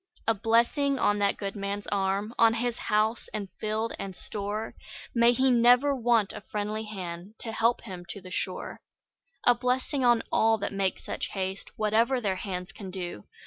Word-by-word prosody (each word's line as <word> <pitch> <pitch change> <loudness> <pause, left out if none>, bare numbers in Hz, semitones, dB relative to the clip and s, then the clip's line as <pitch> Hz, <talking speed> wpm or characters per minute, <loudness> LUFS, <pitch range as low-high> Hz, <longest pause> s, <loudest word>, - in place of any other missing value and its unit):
A 225 - +5
blessing 235 +6 +2
on 205 -4 +2
that 200 -1 +2
good 200 0 -4
man's 200 0 -3
arm, 200 +2 0
On 230 -1 +6
his 240 0 -1
house, 215 +2 0
and 200 -3 -4
field, 220 +1 -1
and 195 -2 -5
store; 210 +3 -4 0.4
May 235 0 +5
he 260 +2 +3
never 245 +4 +5
want 235 -4 +2
a - - -7
friendly 210 +2 -3
hand 185 -1 -7
To 225 - -5
help 230 +2 +2
him 185 -6 -8
to 185 - -6
the 185 -1 -12
shore! 185 0 -4 0.7
A 245 - +7
blessing 255 +3 0
on 240 -2 +4
all 225 0 +4
that 200 -1 -3
make 195 -1 0
such - - -4
haste, 190 0 -3
Whatever 225 +4 +2
their 195 -5 -1
hands 185 -1 -5
can 195 -1 -8
do! 175 - -6
215 Hz, 180 wpm, -28 LUFS, 195-235 Hz, 0.7 s, A